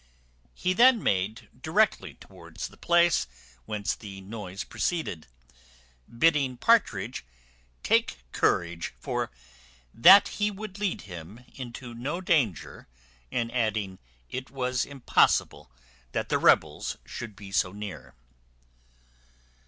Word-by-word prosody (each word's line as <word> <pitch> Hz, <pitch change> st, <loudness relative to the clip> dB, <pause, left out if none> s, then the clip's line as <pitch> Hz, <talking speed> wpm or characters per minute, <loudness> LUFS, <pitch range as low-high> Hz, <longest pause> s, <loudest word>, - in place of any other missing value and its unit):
He 185 Hz, -, 0 dB
then 240 Hz, +2 st, +5 dB
made 105 Hz, +4 st, -1 dB
directly 205 Hz, +7 st, +1 dB
towards -, -, -9 dB
the -, -, -17 dB
place 170 Hz, -1 st, +3 dB, 0.4 s
whence 105 Hz, +3 st, -2 dB
the 100 Hz, -3 st, -10 dB
noise 100 Hz, -1 st, -7 dB
proceeded, 155 Hz, -, -3 dB, 0.8 s
bidding 135 Hz, 0 st, +2 dB
Partridge 125 Hz, -, +2 dB, 0.6 s
"take 60 Hz, -, +1 dB
courage, 85 Hz, 0 st, 0 dB
for -, -, -3 dB, 0.6 s
that 190 Hz, +11 st, +8 dB
he 210 Hz, 0 st, -1 dB
would 205 Hz, -1 st, -8 dB
lead 205 Hz, -3 st, -1 dB
him 95 Hz, +6 st, -10 dB
into 120 Hz, -1 st, -8 dB
no 140 Hz, +9 st, -4 dB
danger;" 155 Hz, -, 0 dB, 0.4 s
and 115 Hz, -1 st, -1 dB
adding, 110 Hz, -5 st, -1 dB, 0.3 s
"it 130 Hz, +1 st, -6 dB
was 125 Hz, -2 st, -1 dB
impossible 135 Hz, -, +1 dB, 0.4 s
the -, -, 0 dB
rebels -, -, +2 dB
should 110 Hz, -4 st, -7 dB
be 100 Hz, -1 st, -11 dB
so 95 Hz, -2 st, +1 dB
near." 105 Hz, -7 st, -8 dB
120 Hz, 105 wpm, -27 LUFS, -, 0.8 s, that